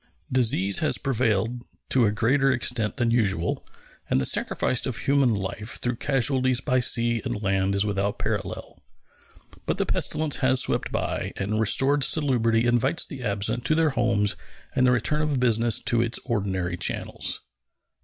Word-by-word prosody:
Disease 110 Hz, -6 st, +1 dB
has 155 Hz, -, +2 dB
prevailed 120 Hz, -3 st, -1 dB, 0.3 s
to 125 Hz, -4 st, +3 dB
a -, -, +1 dB
greater 135 Hz, +6 st, +2 dB
extent 115 Hz, -3 st, 0 dB
than 120 Hz, -3 st, +1 dB
usual, 95 Hz, -8 st, 0 dB, 0.5 s
and -, -, +2 dB
the 65 Hz, -, 0 dB
sacrifice 130 Hz, -, +1 dB
of 125 Hz, -4 st, -3 dB
human 135 Hz, -4 st, +2 dB
life 100 Hz, +3 st, -3 dB
through 120 Hz, -1 st, -2 dB
casualties 130 Hz, -2 st, +1 dB
by 130 Hz, 0 st, 0 dB
sea 120 Hz, -1 st, +2 dB
and 105 Hz, -, -4 dB
land 95 Hz, 0 st, 0 dB
is 100 Hz, +1 st, +1 dB
without 100 Hz, 0 st, -2 dB
parallel. -, -, -4 dB, 0.9 s
But -, -, -1 dB
the -, -, 0 dB
pestilence 155 Hz, -2 st, -1 dB
has 130 Hz, -1 st, +3 dB
swept -, -, 0 dB
by, -, -, -3 dB
and 105 Hz, +3 st, -2 dB
restored 135 Hz, +6 st, +3 dB
salubrity 120 Hz, -7 st, +2 dB
invites 120 Hz, +6 st, +2 dB
the 140 Hz, -5 st, -9 dB
absent 110 Hz, +1 st, -1 dB
to 155 Hz, -, +3 dB
their 160 Hz, -1 st, +2 dB
homes 115 Hz, -5 st, 0 dB, 0.4 s
and 130 Hz, -1 st, +3 dB
the -, -, +4 dB
return 125 Hz, +6 st, 0 dB
of 150 Hz, -4 st, 0 dB
business 115 Hz, -2 st, +2 dB
to 120 Hz, -1 st, +1 dB
its 120 Hz, 0 st, -1 dB
ordinary 95 Hz, -7 st, -2 dB
channels. 90 Hz, -, -2 dB
120 Hz, 160 wpm, -25 LUFS, 105-130 Hz, 0.9 s, the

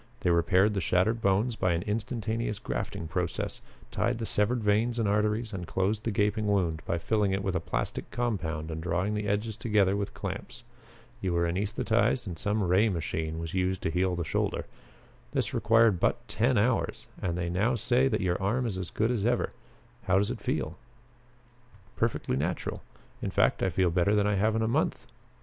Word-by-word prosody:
They 90 Hz, -, +2 dB
repaired 95 Hz, +4 st, +3 dB
the 100 Hz, -, -1 dB
shattered 95 Hz, +7 st, +2 dB
bones 105 Hz, +5 st, +2 dB
by 90 Hz, -4 st, +1 dB
an 85 Hz, -, -1 dB
instantaneous 110 Hz, 0 st, -2 dB
grafting 80 Hz, -, -4 dB
process, 90 Hz, 0 st, -3 dB, 0.3 s
tied 120 Hz, 0 st, 0 dB
the 115 Hz, -, -3 dB
severed 110 Hz, +3 st, 0 dB
veins 110 Hz, +4 st, +2 dB
and 115 Hz, -3 st, +1 dB
arteries 105 Hz, +2 st, +1 dB
and 90 Hz, -3 st, -5 dB
closed 105 Hz, +3 st, 0 dB
the -, -, +1 dB
gaping 105 Hz, +1 st, +1 dB
wound 90 Hz, -6 st, +1 dB
by 85 Hz, -, 0 dB
filling 105 Hz, +2 st, +1 dB
it 95 Hz, 0 st, -1 dB
with 95 Hz, -2 st, -1 dB
a -, -, +2 dB
plastic -, -, -3 dB
compound 85 Hz, -10 st, -2 dB
and 80 Hz, 0 st, -4 dB
drawing 90 Hz, +4 st, 0 dB
the 105 Hz, -1 st, -2 dB
edges 105 Hz, +2 st, -1 dB
together 105 Hz, -4 st, +2 dB
with 100 Hz, 0 st, -3 dB
clamps. 100 Hz, +5 st, -6 dB, 0.6 s
You 95 Hz, -2 st, -1 dB
were 85 Hz, 0 st, +2 dB
anaesthetized 105 Hz, +7 st, +1 dB
and 90 Hz, -4 st, -5 dB
some 105 Hz, 0 st, 0 dB
ray 95 Hz, +5 st, +4 dB
machine 80 Hz, -3 st, -2 dB
was 80 Hz, 0 st, -5 dB
used 95 Hz, 0 st, 0 dB
to 80 Hz, -, 0 dB
heal 90 Hz, +2 st, +1 dB
the 85 Hz, -, -2 dB
shoulder. 70 Hz, -, -1 dB, 0.7 s
This 135 Hz, 0 st, 0 dB
required 115 Hz, -4 st, +4 dB
but 120 Hz, +6 st, 0 dB
ten 115 Hz, +4 st, +1 dB
hours 115 Hz, +4 st, +1 dB, 0.2 s
and 85 Hz, -1 st, -1 dB
they 85 Hz, -1 st, -1 dB
now 110 Hz, +8 st, +2 dB
say 125 Hz, +4 st, +2 dB
that -, -, 0 dB
your 90 Hz, +1 st, 0 dB
arm 115 Hz, +6 st, +1 dB
is 100 Hz, -5 st, -2 dB
as 90 Hz, -, -4 dB
good 110 Hz, +2 st, 0 dB
as 115 Hz, -5 st, -1 dB
ever. 120 Hz, +2 st, +1 dB, 0.5 s
How 95 Hz, 0 st, +3 dB
does 100 Hz, +4 st, +1 dB
it 120 Hz, -4 st, -6 dB
feel?" 80 Hz, -1 st, -2 dB, 1.2 s
"Perfectly 115 Hz, -, 0 dB
natural. 85 Hz, +6 st, -2 dB, 0.4 s
In -, -, -2 dB
fact -, -, +2 dB
I -, -, +2 dB
feel 90 Hz, -2 st, +2 dB
better 90 Hz, +4 st, +2 dB
than 105 Hz, -1 st, +3 dB
I 105 Hz, -, +2 dB
have 110 Hz, +3 st, +2 dB
in 110 Hz, -, +1 dB
a -, -, +1 dB
month." 140 Hz, +8 st, 0 dB
100 Hz, 195 wpm, -29 LUFS, 90-110 Hz, 1.2 s, ray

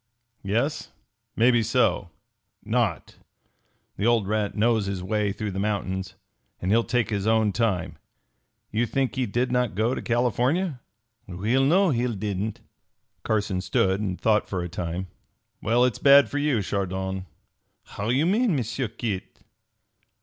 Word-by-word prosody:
"Yes? 115 Hz, +10 st, -1 dB, 0.5 s
Maybe 120 Hz, +1 st, +4 dB
so 110 Hz, -5 st, +1 dB, 0.6 s
not! -, -, -1 dB, 0.8 s
That 100 Hz, -, -1 dB
old 115 Hz, -4 st, +3 dB
rat 105 Hz, -1 st, -1 dB
knows 110 Hz, -2 st, +2 dB
his 95 Hz, -2 st, -3 dB
way 105 Hz, +1 st, 0 dB
through 105 Hz, +1 st, -4 dB
the 95 Hz, -, -4 dB
mountains, 95 Hz, -2 st, -2 dB, 0.4 s
and 95 Hz, -, -1 dB
he'll 115 Hz, +2 st, +4 dB
take 120 Hz, -2 st, 0 dB
his 100 Hz, 0 st, -1 dB
own 110 Hz, -2 st, +3 dB
time. 100 Hz, -5 st, -1 dB, 0.7 s
You 115 Hz, +3 st, 0 dB
think 135 Hz, +2 st, 0 dB
he 130 Hz, -2 st, 0 dB
did 120 Hz, +4 st, -1 dB
not 125 Hz, -5 st, 0 dB
go 110 Hz, +4 st, +1 dB
on -, -, -2 dB
to -, -, -3 dB
California?" 125 Hz, -, 0 dB, 0.5 s
"We'll 105 Hz, +9 st, +1 dB
know 180 Hz, +4 st, +4 dB
he'll 120 Hz, -2 st, 0 dB
didn't." 100 Hz, +1 st, -3 dB, 0.6 s
Carson 105 Hz, -4 st, -1 dB
stood 95 Hz, +1 st, +1 dB
and 95 Hz, -3 st, -3 dB
thought 110 Hz, -1 st, +2 dB
for 90 Hz, -3 st, -2 dB
a 85 Hz, -, -5 dB
time. 85 Hz, +1 st, -4 dB, 0.6 s
"Well, 120 Hz, +3 st, +3 dB
its 125 Hz, -, -1 dB
bad 140 Hz, 0 st, +6 dB
for 145 Hz, -, -1 dB
you, 145 Hz, -8 st, +1 dB
Chardon!" 95 Hz, -1 st, -3 dB, 0.6 s
"How 100 Hz, +2 st, -5 dB
you 135 Hz, +6 st, +2 dB
mean, 210 Hz, +1 st, +2 dB
M'sieu 125 Hz, 0 st, -2 dB
Kit?" 110 Hz, -3 st, -5 dB
110 Hz, 150 wpm, -25 LUFS, 100-125 Hz, 0.8 s, bad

